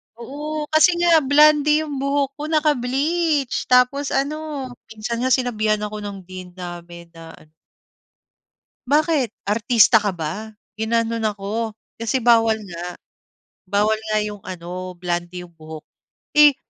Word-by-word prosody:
Oo 295 Hz, +6 st, -5 dB
kasi 315 Hz, +3 st, +5 dB
nga 340 Hz, -2 st, +5 dB
blonde 300 Hz, +1 st, +4 dB
yung 295 Hz, -3 st, -5 dB
buhok 275 Hz, 0 st, 0 dB
ko 295 Hz, -, -6 dB
naka-bleach, 300 Hz, 0 st, 0 dB
tapos 250 Hz, +3 st, +3 dB
ano 290 Hz, -1 st, -3 dB, 0.2 s
minsan 220 Hz, +2 st, -5 dB
nga 255 Hz, -, 0 dB
sinabihan 215 Hz, -4 st, 0 dB
ako 210 Hz, 0 st, -5 dB
ng 205 Hz, -1 st, -6 dB
Dean 185 Hz, 0 st, -10 dB
namin 175 Hz, -1 st, -9 dB
na 165 Hz, -1 st, -12 dB
ano 155 Hz, -, -21 dB, 1.4 s
"Bakit? 295 Hz, -4 st, +1 dB, 0.2 s
Artista 225 Hz, +1 st, +5 dB
ka 205 Hz, -3 st, -2 dB
ba?" 185 Hz, +7 st, -5 dB, 0.2 s
ginanon 230 Hz, 0 st, 0 dB
ako. 215 Hz, +2 st, -3 dB, 0.2 s
Kasi 230 Hz, +3 st, -1 dB
bawal 225 Hz, -2 st, +4 dB
nga, 175 Hz, +1 st, -6 dB, 0.7 s
bawal 205 Hz, +3 st, +1 dB, 0.2 s
nga 215 Hz, -, +2 dB
yung 210 Hz, -1 st, -5 dB
ano, 180 Hz, 0 st, -7 dB
blonde 175 Hz, 0 st, -4 dB
yung 170 Hz, -1 st, -15 dB
buhok. 155 Hz, 0 st, -10 dB, 0.5 s
Eh, 295 Hz, -2 st, +6 dB
230 Hz, 130 wpm, -21 LUFS, 195-285 Hz, 1.4 s, Eh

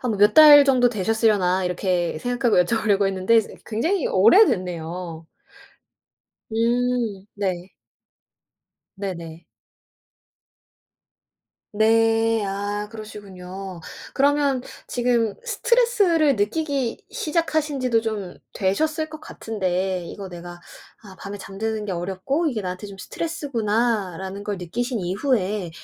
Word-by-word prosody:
'한 240 Hz, -6 st, -1 dB
몇 205 Hz, +1 st, +5 dB
달 295 Hz, -2 st, +10 dB
정도 255 Hz, -3 st, +4 dB
되셨으려나.' 210 Hz, -4 st, +1 dB
이렇게 180 Hz, -2 st, -1 dB
생각하고 245 Hz, -3 st, +2 dB
여쭤보려고 210 Hz, -1 st, +1 dB
했는데 195 Hz, +4 st, +2 dB
이제 220 Hz, -, +1 dB
그 -, -, -25 dB
굉장히 320 Hz, -, 0 dB
오래됐네요. 180 Hz, -, +2 dB, 1.2 s
음. 230 Hz, -3 st, 0 dB
네. 185 Hz, -3 st, -3 dB, 1.3 s
네네. 170 Hz, -4 st, -6 dB, 2.3 s
네. 225 Hz, +1 st, +3 dB
아. 195 Hz, +1 st, -3 dB, 0.2 s
그러시군요. 195 Hz, -4 st, -9 dB, 0.3 s
그러면 280 Hz, -2 st, +2 dB, 0.2 s
지금 235 Hz, -4 st, 0 dB
스트레스를 465 Hz, -, +2 dB
느끼기 260 Hz, +3 st, -1 dB
시작하신 315 Hz, -, -1 dB
지도 245 Hz, -3 st, +2 dB
좀 210 Hz, -5 st, -5 dB, 0.2 s
되셨을 310 Hz, +11 st, 0 dB
것 310 Hz, 0 st, -9 dB
같은데, 185 Hz, -, -3 dB
이거 195 Hz, +1 st, -8 dB
내가 175 Hz, 0 st, -9 dB, 0.4 s
'아, 195 Hz, -3 st, -13 dB
밤에 200 Hz, +1 st, -7 dB
잠드는 210 Hz, +2 st, -4 dB
게 200 Hz, -, -3 dB
어렵고 190 Hz, -, -2 dB
이게 230 Hz, -7 st, -3 dB
나한테 185 Hz, +2 st, -5 dB
좀 200 Hz, -1 st, -10 dB
스트레스구나.'라는 215 Hz, -, -2 dB
걸 205 Hz, -1 st, -3 dB
느끼신 230 Hz, +7 st, -3 dB
이후에 195 Hz, -1 st, -1 dB
215 Hz, 255 characters per minute, -23 LUFS, 190-250 Hz, 2.3 s, 달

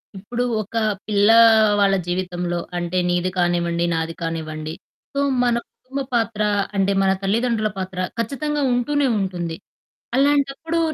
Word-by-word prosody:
ఇప్పుడు, 235 Hz, +6 st, -3 dB, 0.2 s
ఒక 215 Hz, +2 st, -10 dB, 0.3 s
పిల్లా 210 Hz, +2 st, +5 dB, 0.4 s
వాళ్ళ 200 Hz, -1 st, +4 dB
జీవితంలో 175 Hz, -1 st, -2 dB, 0.2 s
అంటే, 175 Hz, +1 st, -2 dB
నీది 175 Hz, +1 st, +1 dB
కానివ్వండి, 175 Hz, -1 st, +1 dB
నాది 165 Hz, 0 st, -2 dB
కానివ్వండి. 155 Hz, -1 st, -4 dB, 0.4 s
సో 280 Hz, -, -1 dB, 0.2 s
మన 240 Hz, -1 st, +2 dB, 0.2 s
కుటుంబ 270 Hz, +2 st, -6 dB
పాత్ర 225 Hz, -2 st, 0 dB, 0.3 s
అంటే, 195 Hz, 0 st, +2 dB
మన 190 Hz, -, +3 dB
తల్లిదండ్రుల 220 Hz, +2 st, +1 dB
పాత్ర 190 Hz, -1 st, -5 dB, 0.2 s
ఖచ్చితంగా 290 Hz, +6 st, -2 dB
ఉంటూనే 275 Hz, +4 st, +1 dB
ఉంటుంది. 175 Hz, -4 st, -3 dB, 0.6 s
అలాంటప్పుడు, 285 Hz, +4 st, +1 dB
195 Hz, 120 wpm, -21 LUFS, 175-245 Hz, 0.6 s, పిల్లా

